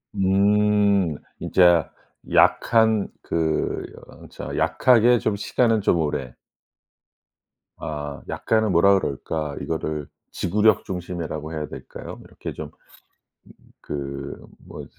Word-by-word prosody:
음. 100 -2 +3 0.2
진짜 85 -3 +4 0.4
약한 110 -3 +4
그 80 -2 -1 0.4
저 - - -7
약하게 120 -1 +4
좀 110 - 0
시간은 115 +2 +1
좀 90 - +2
오래. 70 -5 -2 1.4
아. 75 -2 -6
약간은 110 -2 +1
뭐라 95 +3 +5
그럴까 75 0 -4
이거를 75 -2 -3 0.2
지구력 105 +4 +2
중심이라고 85 -4 -5
해야 75 -1 -4
될까요? - - -9
이렇게 - - -8
좀 - - -7
음 - - -25 1.1
그 70 -1 -6 0.2
뭐 - - -9
90 Hz, 195 characters per minute, -23 LUFS, 75-105 Hz, 1.4 s, 뭐라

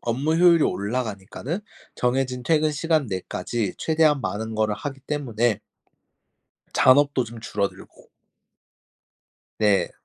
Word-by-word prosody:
업무 135 +7 0
효율이 170 -2 +6
올라가니까는 110 - -3 0.3
정해진 125 0 -1
퇴근 155 0 +3
시간 155 -1 +1
내까지 95 +2 -3
최대한 155 -3 +2
많은 110 -1 -3
거를 110 -1 +1
하기 135 +1 -6
때문에 120 -6 -1 1.1
잔업도 135 0 +4
좀 115 0 -9
줄어들고 100 -3 -5 1.5
네. 105 -2 +2
125 Hz, 250 characters per minute, -24 LUFS, 110-150 Hz, 1.5 s, 효율이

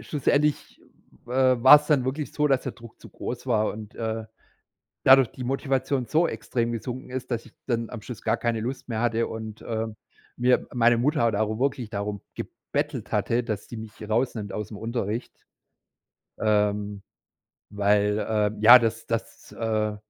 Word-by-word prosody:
schlussendlich, 150 0 0 0.5
äh, 130 0 +3
war's 150 +3 +9
dann 145 -5 +3
wirklich 140 +3 -3
so, 150 - +1
dass 135 -2 +2
der - - -4
Druck 115 -2 -15
zu - - -12
groß 125 +1 -6
war 110 -4 +1
und, 105 -1 -10
äh, 110 -1 -3 0.8
dadurch 130 -2 +7
die 130 - -8
Motivation 135 0 -1
so 160 +8 +2
extrem 120 -1 -2
gesunken 125 +2 -5
ist, 130 0 -5
dass 115 -1 -2
ich 120 - -17
dann 115 -2 -1
am 120 -3 -7
Schluss 120 +1 -8
gar 115 +1 +1
keine 115 -1 -1
Lust 130 +4 -5
mehr 110 -1 -2
hatte 115 -1 +1
und, 110 -1 -7
äh, 115 0 -3 0.5
mir 125 +1 +2
meine 120 -1 +4
Mutter 145 +5 +1
hat 115 -3 +2
aber 110 +1 -1
wirklich 130 -4 -1
darum 100 -1 -4
gebettelt - - -4
hatte, 120 +1 +1
dass 110 -4 -4
die 120 - -8
mich 110 -1 -9
rausnimmt 110 -3 -1
ausm 105 0 -5
Unterricht. 115 +1 -3 1.1
Ähm, 105 -1 0 0.7
weil, 105 +1 +2
ähm, 105 -1 0
ja, 120 +4 +10
das 115 -1 -2
das, 115 -1 -5
äh, 110 -2 -1
115 Hz, 165 wpm, -25 LUFS, 110-130 Hz, 1.1 s, ja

